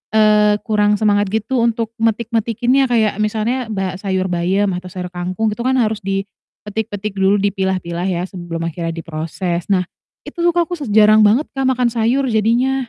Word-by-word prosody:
eee, 210 -1 +4
kurang 210 -1 +2
semangat 205 -2 +2
gitu 220 +4 -1
untuk 230 -1 0
metik-metikinnya, 230 +3 +1
kayak 220 -4 +2
misalnya 225 +3 -1
ba 190 -2 -2
sayur 190 -2 -1
bayam 185 +2 0
atau 180 0 -7
sayur 180 -1 -5
kangkung 185 +5 -2
itu - - -24
kan 260 +1 +1
harus 215 -2 0
dipetik-petik 205 +1 -5
dulu, 195 +1 +4
dipilah-pilah 190 -3 -1
ya 175 -1 -1
sebelum 170 -2 -6
akhirnya 165 0 -4
diproses. 165 +2 -4
Nah 185 -2 +3 0.4
itu - - -11
tuh 345 0 +3
aku 345 0 0 0.2
jarang 215 0 +6
banget, 240 +9 +3
Kak, 270 -1 -1
makan 250 -2 +2
sayur 240 +4 +1
jadinya. 235 +5 +2
210 Hz, 160 wpm, -18 LUFS, 185-230 Hz, 0.4 s, jarang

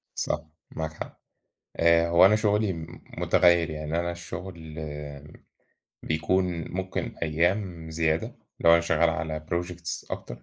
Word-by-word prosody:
صح 75 - -1 0.3
معاك 80 -1 -3
حق، - - -9 0.6
آآ 85 0 +5
هو 85 +2 +7
أنا 100 +3 +6
شغلي 105 -2 +2
م 80 -1 -9 0.2
متغير 85 -1 +4
يعني 75 +1 -2
أنا 85 0 -1
الشغل 85 -2 -8
آآ 75 -1 -7 0.8
بيكون 85 +4 +1 0.3
ممكن 95 +1 -3
أيام 85 +1 0
زيادة، 80 0 0 0.3
لو 85 - +6
أنا 85 - +7
شغال 85 0 +2
على 80 -2 -4
projects 85 -1 -3
أكتر، - - -6
85 Hz, 130 wpm, -27 LUFS, 80-90 Hz, 0.8 s, هو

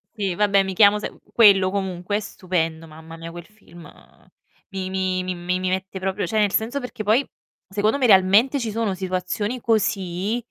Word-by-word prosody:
Sì 195 -4 -2
vabbè 200 -1 +3
mi 190 0 -4
chiamo 205 +1 +5
Sa - - -4 0.2
quello 200 -5 +6
comunque 190 0 -2
è - - -2
stupendo, 165 -5 -3
mamma 160 +1 -12
mia 165 0 -8
quel 175 0 -10
film 185 -5 -16 0.8
mi 185 -1 -4
mi 185 -1 -1
mi 185 0 -3 0.2
mi 185 - -1
mette 190 +1 -3
proprio 190 +2 -2
cioè 220 - 0
nel 205 -2 +2
senso 240 +7 -1
perché 250 -3 -7
poi, 225 +7 +2 0.4
secondo 210 +5 0
me 260 -3 +2
realmente 205 +8 +5
ci 225 -3 -3
sono 220 -3 -1
situazioni 190 +5 -3
così 200 -1 0
195 Hz, 175 wpm, -22 LUFS, 185-215 Hz, 0.8 s, quello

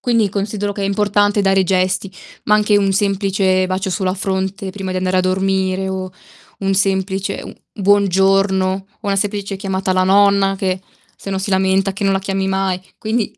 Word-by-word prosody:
Quindi 230 -4 +2
considero 205 +1 -3
che 200 0 -5
è - - 0
importante 205 +1 +1
dare 195 0 +3
gesti, 185 +1 0 0.3
ma 210 - +3
anche 210 0 +3
un 195 -1 +2
semplice 195 -2 +1
bacio 190 +1 -2
sulla 185 0 -1
fronte 190 0 -3
prima 190 -1 -6
di 185 - -3
andare 185 0 0
a - - +5
dormire, 190 0 0
o 185 -1 -4 0.5
un 195 0 0
semplice 195 0 0
un - - -9 0.2
buongiorno 195 -1 +2
o 195 +2 -9
una 200 -1 +1
semplice 200 0 -2
chiamata 190 -1 -2
alla 185 0 +2
nonna 200 0 +4
che 185 -1 -1 0.4
se 195 - -7
no 190 - -1
si 190 - -4
lamenta 190 +1 +2
che 205 - -3
non 195 - +3
la 195 - +1
chiami 195 0 -2
mai. 190 -1 -1 0.2
Quindi 220 0 -1
195 Hz, 185 wpm, -18 LUFS, 190-200 Hz, 0.5 s, a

